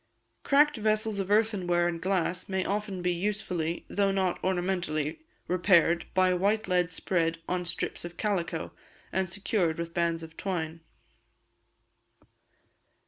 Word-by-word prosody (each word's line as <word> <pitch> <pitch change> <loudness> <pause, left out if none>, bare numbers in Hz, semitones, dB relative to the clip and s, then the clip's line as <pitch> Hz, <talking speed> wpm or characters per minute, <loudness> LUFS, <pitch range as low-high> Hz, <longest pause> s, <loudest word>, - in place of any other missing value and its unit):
Cracked 295 0 +4
vessels 215 -1 +1
of 195 -1 -2
earthenware 190 -5 +2
and 170 -1 -3
glass 185 -1 0
may 190 -1 0
often 200 -2 -2
be 180 - +2
usefully, 175 -3 -2
though 200 -1 +1
not 190 -2 0
ornamentally, 175 -5 -1 0.3
repaired 175 -2 +3
by 185 -1 +4
white 205 +4 +1
lead 180 -1 +2
spread 165 -3 0
on 180 0 -1
strips 175 - -3
of 175 0 -8
calico, 175 -6 -1 0.4
and 190 -1 0
secured 185 -3 0
with 170 0 -4
bands 170 -1 0
of 160 0 -11
twine. 165 -4 -3
180 Hz, 130 wpm, -29 LUFS, 170-200 Hz, 0.4 s, Cracked